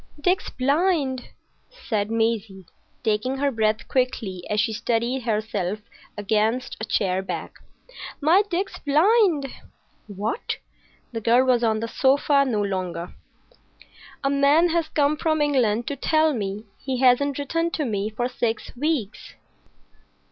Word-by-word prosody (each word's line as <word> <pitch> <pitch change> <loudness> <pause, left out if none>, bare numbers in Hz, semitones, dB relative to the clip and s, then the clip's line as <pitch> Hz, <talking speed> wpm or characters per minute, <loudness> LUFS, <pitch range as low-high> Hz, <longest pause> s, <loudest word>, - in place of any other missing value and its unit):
"Dick's 360 +5 +1
blind!" 280 -2 0 0.4
said 220 - -3
Maisie, 225 -4 -1 0.4
taking 225 +4 0
her 280 +1 +1
breath 220 -1 0
quickly 230 -8 -1
as 210 - 0
she 225 +1 +1
steadied 235 +4 -1
herself 215 -4 -2 0.4
against 220 +4 0
a - - -2
chair 190 -4 0
back. 190 - -6 0.6
"My 325 +7 +5
Dick's 380 +2 -2
blind!" 330 +1 +3 0.6
"What?" 205 +2 -3 0.5
The 225 -2 -4
girl 240 +4 +4
was 245 -2 +3
on 220 -1 +1
the 230 - -2
sofa 275 +3 +3
no 215 -5 0
longer. 185 -3 -3 1.1
"A 275 - +2
man 285 +5 +4
has 335 -1 0
come 300 -1 +1
from 315 0 0
England 245 -6 +2
to 285 - -3
tell 310 +2 +2
me. 205 -2 -4
He 265 -1 -3
hasn't 265 +2 +4
written 330 +4 -1
to 310 -3 -2
me 210 -3 -1
for 240 +3 -2
six 235 -2 -3
weeks." 270 -6 -3
250 Hz, 135 wpm, -24 LUFS, 215-290 Hz, 1.1 s, My